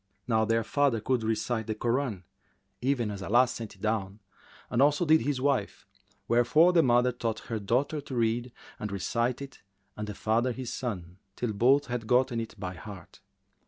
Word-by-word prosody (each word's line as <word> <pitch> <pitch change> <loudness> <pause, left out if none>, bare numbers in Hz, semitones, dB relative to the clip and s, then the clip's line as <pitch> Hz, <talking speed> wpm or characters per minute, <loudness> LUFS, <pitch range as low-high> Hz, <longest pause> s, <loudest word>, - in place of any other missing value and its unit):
Now 110 -2 +2
their 115 +1 +1
father 140 0 +1
could 125 +2 0
recite 110 +1 -1
the 110 - -2
Koran, 120 -3 -1 0.6
even 125 -4 0
as 100 -1 -6
Allah 120 +6 +4
sent 115 -3 -7
it 95 - -23
down, 105 -2 -1 0.5
as 120 - +2
also 145 +4 +4
did 160 0 +5
his 135 +2 -1
wife, 140 0 -1 0.4
wherefore 135 +9 +4
the 170 - +6
mother 125 -2 +3
taught 115 -2 -3
her 110 - -1
daughter 130 +9 0
to 135 -2 -7
read 120 +1 0 0.3
and 105 -1 -4
recite 115 +7 -1
it 135 - -12 0.3
and 105 0 -5
the 105 - -6
father 115 +5 +1
his 130 -1 -5
son 90 -8 -5 0.2
till 120 -3 -2
both 130 +7 +4
had 120 -2 -4
gotten 125 -1 +2
it 115 - -7
by 95 -2 -4
heart. 90 0 -11
120 Hz, 180 wpm, -28 LUFS, 110-130 Hz, 0.6 s, the